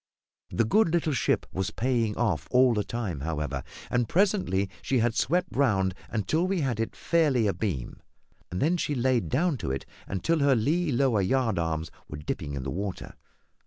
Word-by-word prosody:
The 115 - +1
good 210 - +3
little 165 -3 +1
ship 125 - +1
was 95 +1 -1
paying 115 -2 0
off 110 -9 0
all 125 -1 +5
the 105 -2 0
time, 100 - -4
however, 75 -3 -3 0.3
and 120 -2 +1
presently 185 - +2
she 135 - 0
had 120 -1 +2
swept 175 +9 0
round 95 -9 +2 0.2
until 155 - 0
we 190 -3 0
had 125 -6 -1
it 115 - -2
fairly 150 -9 +2
abeam, 95 - -2 0.5
when 150 - +1
she 150 -3 -1
laid 125 -1 +1
down 155 +2 +1
to - - -4
it 65 0 -3 0.2
until 155 - 0
her 140 -2 +4
lee 150 +8 +1
lower 120 -4 +2
yardarms 85 -9 0 0.2
were 75 - -7
dipping 75 -1 -4
in 65 - -4
the 65 - -3
water. 95 +3 -4
115 Hz, 170 wpm, -27 LUFS, 95-140 Hz, 0.5 s, all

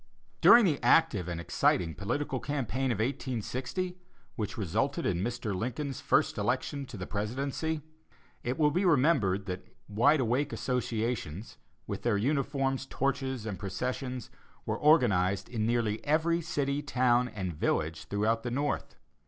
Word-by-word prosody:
During 235 -2 +8
the 155 -6 +1
active 120 - +4
and 85 -1 -3
exciting 85 0 +1
political 130 - -2
campaign 135 -2 -1
of 115 - -1
1860, 130 - -3 0.4
which 105 -3 -4
resulted 115 - -1
in 90 -2 +1
Mr. 120 -1 -2
Lincoln's 130 +6 -3
first - - +2
election 140 -2 -1
to 120 - -8
the 90 - -5
presidency, 135 - -2 0.6
it 125 +4 -2
will 150 -2 +4
be 180 +6 +1
remembered 130 - +3
that 90 -1 -5 0.2
"Wide 120 +9 +4
Awake" 130 +4 +1
associations, 115 - -2 0.3
with - - -4
their 115 -4 +1
uniforms, 135 +2 0
torches 130 -4 -2
and 105 -4 -4
processions, 125 +5 -4 0.3
were - - -2
organized 100 - +3
in 110 -2 -1
nearly 115 -2 0
every 165 +3 +2
city, 145 -3 -1
town 125 -3 +2
and 95 -6 -4
village 80 +1 -1
throughout 110 +3 0
the 120 - -3
North. 145 +4 -2
125 Hz, 140 wpm, -30 LUFS, 105-140 Hz, 0.6 s, During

